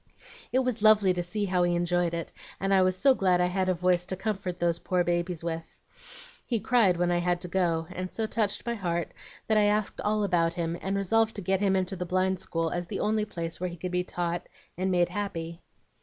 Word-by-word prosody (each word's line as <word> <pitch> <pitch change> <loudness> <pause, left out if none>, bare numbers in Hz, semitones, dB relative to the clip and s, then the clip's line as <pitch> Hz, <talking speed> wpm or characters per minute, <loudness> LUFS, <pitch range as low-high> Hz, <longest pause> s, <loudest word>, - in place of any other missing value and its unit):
It - - +2
was 245 -3 -1
lovely 210 -3 +5
to 175 - -2
see 205 +4 -2
how 185 -2 +1
he 175 0 +2
enjoyed 175 0 +1
it, 170 - -5 0.3
and 195 0 +1
I 190 - +5
was 185 0 +2
so 270 +6 +5
glad 185 -6 +2
I 180 - +3
had 185 +1 0
a 185 - +2
voice 180 0 +2
to 190 - -2
comfort 190 -2 -3
those 170 -1 0
poor 180 -1 +1
babies 175 -1 -1
with. 165 -1 -5 0.7
He 235 -3 -1
cried 210 -7 +3
when 175 0 +1
I 175 - +2
had 175 0 0
to - - -6
go, 170 -3 0
and 185 0 -5
so 225 - -2
touched 215 -2 -1
my 235 - -1
heart 175 -6 -2 0.3
that 220 -1 +3
I 210 - +4
asked 210 0 0
all 210 0 +1
about 170 -3 +1
him, 170 -1 -2
and 195 +1 -1
resolved 225 +3 +2
to 200 - -4
get 190 +1 +1
him 195 -1 +2
into 190 +1 0
the 180 - -3
Blind 185 +1 +1
School 165 -2 -2
as 175 0 -3
the - - -4
only 215 0 +1
place 165 -5 -5
where 180 0 -2
he 175 - -9
could 180 +2 -5
be 180 0 0
taught 175 -1 -3 0.3
and 185 +1 -1
made 175 -1 +2
happy." 170 -4 -4
180 Hz, 235 wpm, -28 LUFS, 175-200 Hz, 0.7 s, lovely